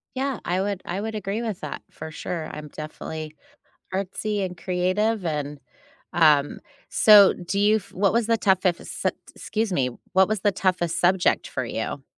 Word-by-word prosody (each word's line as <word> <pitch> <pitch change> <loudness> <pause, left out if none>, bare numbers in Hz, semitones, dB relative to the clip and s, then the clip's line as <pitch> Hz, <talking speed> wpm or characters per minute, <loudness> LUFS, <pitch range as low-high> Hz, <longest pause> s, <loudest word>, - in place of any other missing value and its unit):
Yeah, 265 -2 -1
I 180 +2 0
would 200 -2 -2
I 185 +3 -3
would 220 0 -4
agree 210 +2 -3
with 220 -6 -4
that, 150 - -6
for 160 - -8
sure, 160 0 -5
I'm 150 0 -7
definitely 155 +1 -7 0.6
artsy 200 +2 -2
and 180 -2 -5
creative, 185 +4 0
and, 150 -2 -3 0.5
um, 150 -4 +4 0.3
so 205 -3 +7
do 180 +3 -3
you 210 +1 +4
f 205 - -11
what 200 +2 +2
was 230 -1 +1
the 230 -1 +3
toughest 190 -3 +1 0.2
excuse 220 -2 -2
me, 125 -5 +1 0.2
what 190 0 +5
was 215 -3 -1
the 205 - +3
toughest 180 -3 0
subject 180 +1 +2
for - - -3
you? - - -4
185 Hz, 170 wpm, -24 LUFS, 170-210 Hz, 0.6 s, so